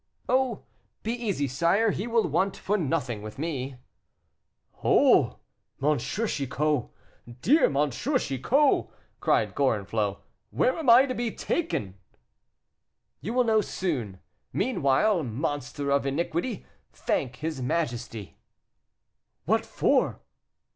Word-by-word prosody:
"Oh! 255 Hz, -3 st, +1 dB, 0.4 s
be 225 Hz, -, -1 dB
easy, 205 Hz, -, -1 dB
sire, 170 Hz, -, +2 dB
he 205 Hz, -, -3 dB
will 230 Hz, -1 st, +2 dB
want 195 Hz, +1 st, 0 dB
for 205 Hz, -, -1 dB
nothing 130 Hz, -, -1 dB
with 105 Hz, 0 st, -8 dB
me." 140 Hz, -4 st, -3 dB, 1.1 s
"Oh! -, -, +4 dB, 0.4 s
M. 150 Hz, +2 st, +2 dB
Chicot, 150 Hz, -, -1 dB, 0.5 s
dear 300 Hz, +8 st, +5 dB
M. 145 Hz, +1 st, +1 dB
Chicot," 260 Hz, -, +1 dB, 0.3 s
cried -, -, +1 dB
Gorenflot, -, -, 0 dB, 0.3 s
"where -, -, +1 dB
am 315 Hz, -6 st, -1 dB
I 245 Hz, +3 st, +8 dB
to 255 Hz, -, -3 dB
be 240 Hz, -1 st, -2 dB
taken 220 Hz, -, -2 dB
to?" 95 Hz, -, -28 dB, 1.2 s
"You 205 Hz, +11 st, -4 dB
will 250 Hz, -, +4 dB
know 220 Hz, -2 st, +3 dB
soon. 125 Hz, -, -3 dB, 0.3 s
Meanwhile, 190 Hz, -, +2 dB
monster 140 Hz, +2 st, -3 dB
of 140 Hz, 0 st, +2 dB
iniquity, 170 Hz, -, -2 dB, 0.3 s
thank 125 Hz, -1 st, -2 dB
his 155 Hz, 0 st, -4 dB
majesty." 120 Hz, -, -3 dB, 1.1 s
"What -, -, +1 dB
for?" -, -, +1 dB
160 Hz, 115 wpm, -27 LUFS, -, 1.2 s, I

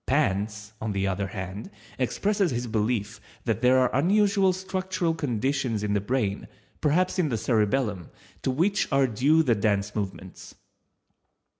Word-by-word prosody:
_ -, -, -53 dB
Panse, 105 Hz, -6 st, 0 dB
on 110 Hz, -2 st, -2 dB
the 100 Hz, 0 st, 0 dB
other 100 Hz, +1 st, -1 dB
hand, 95 Hz, +2 st, -6 dB, 0.3 s
expresses 200 Hz, -, +1 dB
his 120 Hz, -2 st, -2 dB
belief 110 Hz, -1 st, -1 dB, 0.2 s
that 115 Hz, -4 st, 0 dB
there 125 Hz, +1 st, +5 dB
are 130 Hz, -1 st, +2 dB
unusual 195 Hz, +5 st, +3 dB
structural 185 Hz, -2 st, -2 dB
conditions 130 Hz, -5 st, -1 dB
in 105 Hz, -1 st, 0 dB
the 105 Hz, -, +1 dB
brain, 105 Hz, -2 st, -1 dB, 0.3 s
perhaps 180 Hz, +6 st, +1 dB
in 165 Hz, -5 st, +2 dB
the 115 Hz, -, -1 dB
cerebellum, 105 Hz, -, 0 dB, 0.3 s
to -, -, -1 dB
which 170 Hz, +11 st, +1 dB
are 135 Hz, -1 st, +4 dB
due 140 Hz, +7 st, +3 dB
the 125 Hz, -6 st, +3 dB
dance 100 Hz, -1 st, 0 dB
movements. 95 Hz, -3 st, -6 dB
120 Hz, 150 wpm, -26 LUFS, 105-155 Hz, 0.3 s, there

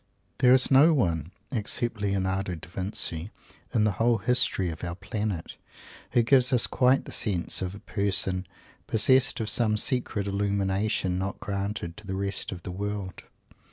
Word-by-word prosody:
There 125 Hz, 0 st, +6 dB
is 130 Hz, +1 st, +3 dB
no 145 Hz, +5 st, +7 dB
one, 85 Hz, -, 0 dB, 0.2 s
except 115 Hz, -1 st, -1 dB
Leonardo 95 Hz, -2 st, -1 dB
Da 80 Hz, 0 st, -10 dB
Vinci, 90 Hz, -1 st, -3 dB, 0.4 s
in 115 Hz, -4 st, +2 dB
the 105 Hz, -, +3 dB
whole 115 Hz, +4 st, +2 dB
history 100 Hz, -5 st, +1 dB
of 80 Hz, -, -9 dB
our 85 Hz, -1 st, -3 dB
Planet, 95 Hz, -1 st, -4 dB, 0.6 s
who 120 Hz, -, +4 dB
gives 130 Hz, +1 st, +4 dB
us 125 Hz, -3 st, +3 dB
quite 130 Hz, +1 st, +2 dB
that -, -, -9 dB
sense 95 Hz, -5 st, 0 dB
of 95 Hz, +1 st, -3 dB
a -, -, -10 dB
person 95 Hz, -3 st, -1 dB, 0.4 s
possessed 130 Hz, +4 st, +3 dB
of 110 Hz, -, -2 dB
some 110 Hz, -1 st, +2 dB
secret 120 Hz, -4 st, 0 dB
illumination 100 Hz, -1 st, 0 dB
not 95 Hz, +1 st, -4 dB
granted 100 Hz, -4 st, -4 dB
to 110 Hz, -, -10 dB
the 95 Hz, -, -3 dB
rest 100 Hz, +1 st, -2 dB
of 90 Hz, -2 st, -8 dB
the 90 Hz, -, -5 dB
world. 100 Hz, 0 st, -5 dB
100 Hz, 160 wpm, -27 LUFS, 95-115 Hz, 0.6 s, no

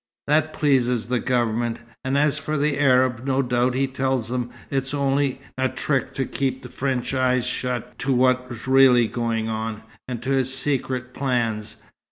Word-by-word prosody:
That 155 Hz, +2 st, +2 dB
pleases 125 Hz, -6 st, +2 dB
the 125 Hz, -1 st, +1 dB
Government 120 Hz, -2 st, 0 dB, 0.3 s
and 130 Hz, +1 st, 0 dB
as 150 Hz, +1 st, +2 dB
for 150 Hz, +1 st, -2 dB
the 145 Hz, 0 st, 0 dB
Arabs, 130 Hz, -3 st, +3 dB
no 135 Hz, 0 st, +1 dB
doubt 125 Hz, 0 st, +1 dB
he 135 Hz, +1 st, +2 dB
tells 130 Hz, -3 st, -1 dB
them 125 Hz, -1 st, -2 dB, 0.2 s
it's 135 Hz, +1 st, -1 dB
only 140 Hz, -1 st, 0 dB, 0.2 s
a 130 Hz, 0 st, +2 dB
trick 135 Hz, 0 st, -1 dB
to 135 Hz, -, 0 dB
keep 135 Hz, -1 st, -2 dB
French 130 Hz, -1 st, -2 dB
eyes 130 Hz, -1 st, +2 dB
shut 125 Hz, -2 st, -3 dB
to 135 Hz, -, -1 dB
what's 125 Hz, -2 st, +1 dB
really 130 Hz, -3 st, +6 dB
going 115 Hz, -1 st, -1 dB
on, 110 Hz, -1 st, -3 dB, 0.2 s
and 125 Hz, -2 st, -4 dB
to 135 Hz, -, -2 dB
his 130 Hz, -1 st, +2 dB
secret 130 Hz, -2 st, -2 dB
plans. 115 Hz, -6 st, -1 dB
130 Hz, 165 wpm, -23 LUFS, 120-135 Hz, 0.3 s, really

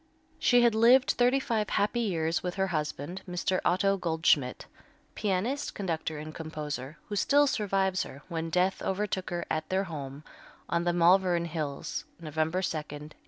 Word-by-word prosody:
She 245 Hz, -1 st, +5 dB
had 235 Hz, -2 st, +5 dB
lived 240 Hz, +4 st, +5 dB
thirty 250 Hz, +2 st, +3 dB
five 220 Hz, -6 st, -1 dB
happy 210 Hz, +4 st, +1 dB
years 170 Hz, -7 st, 0 dB
with 180 Hz, -1 st, -4 dB
her 190 Hz, 0 st, 0 dB
husband, 155 Hz, +3 st, -3 dB
Mr. 180 Hz, +1 st, 0 dB
Otto 195 Hz, +2 st, +2 dB
Goldschmidt, 160 Hz, -7 st, +1 dB, 0.5 s
pianist, 215 Hz, +7 st, -1 dB
conductor 160 Hz, -5 st, -3 dB
and 155 Hz, +1 st, -7 dB
composer, 150 Hz, -3 st, -6 dB
who 205 Hz, -, -3 dB
still 285 Hz, +8 st, +4 dB
survives 195 Hz, -7 st, +1 dB
her, 140 Hz, +2 st, -7 dB
when 165 Hz, -2 st, -3 dB
death 180 Hz, +3 st, +1 dB
overtook 190 Hz, -1 st, -2 dB
her 175 Hz, -1 st, -3 dB
at 155 Hz, 0 st, -2 dB
their 190 Hz, +1 st, +1 dB
home 145 Hz, -5 st, -7 dB, 0.4 s
on 170 Hz, 0 st, 0 dB
the 175 Hz, -, +3 dB
Malvern 175 Hz, 0 st, +4 dB
Hills, 155 Hz, -4 st, -4 dB
November 160 Hz, +3 st, -1 dB
2, 165 Hz, -, -1 dB
1887. 150 Hz, 0 st, -7 dB
175 Hz, 160 wpm, -29 LUFS, 155-195 Hz, 0.5 s, She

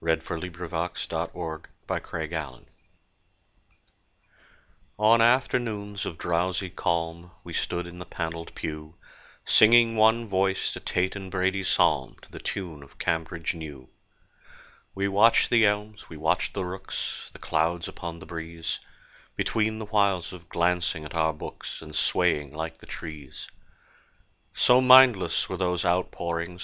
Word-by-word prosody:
AFTERNOON 80 Hz, +2 st, -1 dB
SERVICE 90 Hz, -1 st, -3 dB
AT -, -, -3 dB
MELLSTOCK 80 Hz, -3 st, -5 dB, 0.2 s
(Circa -, -, -4 dB
1850) 80 Hz, -1 st, -5 dB, 2.3 s
ON 110 Hz, +2 st, +5 dB
afternoons 115 Hz, -4 st, +1 dB
of 80 Hz, -, -6 dB
drowsy 90 Hz, +2 st, -1 dB
calm 85 Hz, +1 st, -2 dB
We 85 Hz, -, -9 dB
stood 85 Hz, +1 st, -2 dB
in 85 Hz, 0 st, -10 dB
the 90 Hz, -, -8 dB
panelled 85 Hz, -1 st, -5 dB
pew, 75 Hz, +1 st, -6 dB, 0.5 s
Singing 115 Hz, +1 st, +6 dB
one 110 Hz, +1 st, +4 dB
voiced 95 Hz, -1 st, 0 dB
a -, -, -6 dB
Tate 90 Hz, +2 st, -1 dB
and 95 Hz, -1 st, -6 dB
Brady 95 Hz, +1 st, 0 dB
psalm -, -, +2 dB
To -, -, -16 dB
the -, -, -9 dB
tune 85 Hz, -7 st, -5 dB
of 70 Hz, -, -16 dB
"Cambridge 85 Hz, +1 st, -1 dB
New." 75 Hz, -6 st, -9 dB, 1.1 s
We 100 Hz, 0 st, 0 dB
watched 105 Hz, +4 st, +4 dB
the 115 Hz, -3 st, +6 dB
elms, 105 Hz, +1 st, -3 dB
we 80 Hz, -, -9 dB
watched 80 Hz, +3 st, 0 dB
the 95 Hz, -2 st, -1 dB
rooks, 95 Hz, +1 st, -5 dB
The -, -, -12 dB
clouds 80 Hz, +2 st, 0 dB
upon 85 Hz, -1 st, -7 dB
the 90 Hz, -, -11 dB
breeze, 80 Hz, -1 st, -5 dB, 0.6 s
Between 110 Hz, 0 st, 0 dB
the 110 Hz, -, -5 dB
whiles 100 Hz, -5 st, +1 dB
of 85 Hz, -2 st, -12 dB
glancing 85 Hz, -2 st, 0 dB
at 75 Hz, -, -8 dB
our 80 Hz, -1 st, +2 dB
books, 75 Hz, -, -8 dB
And 75 Hz, -, -11 dB
swaying 75 Hz, -6 st, +1 dB
like 80 Hz, +1 st, -5 dB
the -, -, -15 dB
trees. 75 Hz, -5 st, -8 dB, 1.1 s
So 125 Hz, +1 st, +5 dB
mindless 130 Hz, -5 st, +6 dB
were -, -, -4 dB
those 90 Hz, -2 st, 0 dB
outpourings! 85 Hz, -1 st, -1 dB
90 Hz, 140 wpm, -27 LUFS, 80-100 Hz, 2.3 s, Singing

